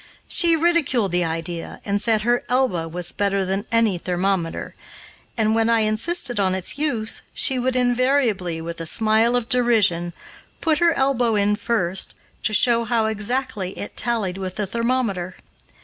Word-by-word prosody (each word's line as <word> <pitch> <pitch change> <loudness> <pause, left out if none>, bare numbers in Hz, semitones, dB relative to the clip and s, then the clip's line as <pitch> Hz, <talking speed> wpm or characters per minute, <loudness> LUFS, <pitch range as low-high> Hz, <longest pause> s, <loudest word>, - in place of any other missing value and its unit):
She 340 -3 +3
ridiculed 310 - +1
the 175 0 +1
idea, 165 +1 -4
and 200 0 0
said 220 -2 +2
her 240 +1 +1
elbow 245 -10 +1
was 175 +1 0
better 200 -1 -1
than 195 +3 -3
any 225 -6 +2
thermometer, 180 -1 -2 0.6
and, 220 -1 +2
when 225 0 +2
I 230 -1 +3
insisted 240 +4 +1
on 190 -1 +1
its 185 -1 -1
use, 235 -8 -1
she 265 -4 +2
would 255 +1 -1
invariably, 245 -9 +1
with 165 0 -6
a 165 - -1
smile 220 +4 +3
of 245 -2 0
derision, 215 -9 +2 0.5
put 315 -2 +1
her 340 -1 +4
elbow 250 -5 +1
in 205 0 +2
first, 195 -5 -1 0.3
to - - 0
show 235 +2 +4
how 230 -1 +1
exactly 215 -2 -3
it 205 - -7
tallied 210 -6 0
with 185 -1 -5
the 210 -1 -2
thermometer. 230 -5 -2
220 Hz, 160 wpm, -22 LUFS, 190-245 Hz, 0.6 s, her